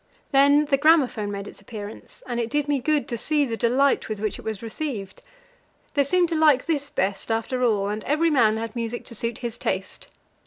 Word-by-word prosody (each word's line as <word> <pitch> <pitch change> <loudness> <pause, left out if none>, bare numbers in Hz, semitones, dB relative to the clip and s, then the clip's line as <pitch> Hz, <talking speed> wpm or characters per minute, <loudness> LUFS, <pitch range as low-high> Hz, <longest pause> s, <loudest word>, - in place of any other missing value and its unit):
Then 285 +2 +5
the 280 -2 +2
gramophone 280 -9 +3
made 200 0 -5
its - - -12
appearance, 205 0 -10
and 240 -1 -3
it 235 -1 -1
did 295 +1 0
me 290 -1 +1
good 300 +2 0
to 235 -3 -3
see 300 +2 +1
the 230 -3 -3
delight 255 +4 +2
with 215 -2 -3
which 215 -1 -2
it - - -8
was 220 -1 -5
received. 225 -5 -5 0.7
They 285 - +3
seemed 350 +4 +2
to 335 - -1
like 305 -5 +4
this 285 -4 -1
best, 195 -1 -2
after 225 +3 -1
all, 210 -4 +2
and 210 +1 -4
every 315 +3 +2
man 220 -6 +4
had 225 0 -5
music 235 0 -4
to - - -11
suit 230 +1 -3
his 235 0 -5
taste. - - -3
245 Hz, 210 wpm, -24 LUFS, 220-290 Hz, 0.7 s, Then